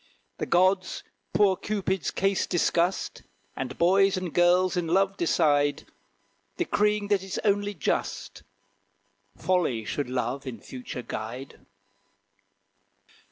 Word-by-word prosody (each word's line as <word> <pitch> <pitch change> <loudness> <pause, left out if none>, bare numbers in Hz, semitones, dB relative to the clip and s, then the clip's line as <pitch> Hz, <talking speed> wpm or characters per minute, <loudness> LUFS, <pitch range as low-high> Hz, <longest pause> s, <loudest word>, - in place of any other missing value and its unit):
The - - -2
gods 185 +2 +2 0.3
poor 200 -2 +4
Cupid's 195 -3 -2
case 195 -1 0
discussed, 175 +1 0 0.3
And - - -5
boys 195 +2 +4
and 185 -3 -4
girls 180 +1 +4
in 175 -2 -1
love 195 +3 +2
decide, 145 -5 +2 0.7
Decreeing 210 - +1
that 200 -2 +3
it's 190 0 -5
only 205 0 +1
just, 155 - -2 1.0
Folly 165 -12 0
should 145 +2 -3
Love 125 +2 -2
in 120 -4 -6
future 125 +2 -7
guide. 120 +6 -7
180 Hz, 110 wpm, -27 LUFS, 145-195 Hz, 1.0 s, poor